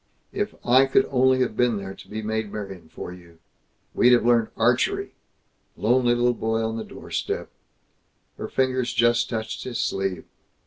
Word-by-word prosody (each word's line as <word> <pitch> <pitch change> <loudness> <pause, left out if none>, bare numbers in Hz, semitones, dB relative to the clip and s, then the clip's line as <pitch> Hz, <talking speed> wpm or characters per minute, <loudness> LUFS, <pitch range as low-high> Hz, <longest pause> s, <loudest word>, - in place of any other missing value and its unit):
"If - - -2
I 130 +3 +5
could 200 +9 +3
only 130 0 +3
have 120 -4 0
been 120 -2 +2
there, 95 -1 -6
to - - -14
be 110 +1 -5
Maid 110 -1 -2
Marian 95 -6 -7
for 90 - -8
you! 85 -2 -16 0.6
We'd 125 +1 +5
have 120 - +4
learned 120 -2 +4
archery! - - +1 0.6
Lonely 120 +2 +3
little 120 0 +2
boy 115 -1 -1
on 110 0 -3
the 110 - -4
doorstep!" - - -5 0.9
Her - - -4
fingers 130 -2 0
just 120 0 +3
touched 110 -2 -4
his 125 -2 -4
sleeve. 95 -3 -2
115 Hz, 165 wpm, -24 LUFS, 105-125 Hz, 0.9 s, I